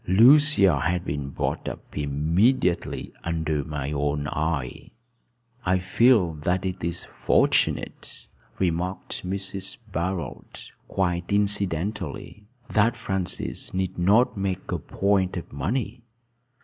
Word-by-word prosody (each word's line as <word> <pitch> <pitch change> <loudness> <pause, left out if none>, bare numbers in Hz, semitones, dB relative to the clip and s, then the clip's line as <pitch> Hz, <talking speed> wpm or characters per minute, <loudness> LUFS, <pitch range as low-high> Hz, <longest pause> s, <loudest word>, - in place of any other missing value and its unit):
Lucia 115 - +6
has 90 +5 +1
been 70 -4 -3
brought - - -2
up - - -11
immediately 85 - +1
under 80 -3 -1
my 75 -1 -4
own 75 0 -1
eye." 80 -4 -2 0.7
"I 95 0 +2
feel 95 0 +3
that 90 +4 0
it 95 -1 -4
is 85 +1 -2
fortunate," - - 0 0.3
remarked 90 +1 -2
Mrs. 95 +3 -4
Barold, 85 -1 -4 0.2
quite 90 -2 -1
incidentally, 100 -1 -1 0.2
"that 115 +2 +2
Francis 95 -4 -3
need 95 -1 -2
not 105 +8 +4
make 95 -2 -3
a - - -1
point 95 -2 0
of 85 - -7
money." 110 - -2
90 Hz, 110 wpm, -25 LUFS, 80-100 Hz, 0.7 s, Lucia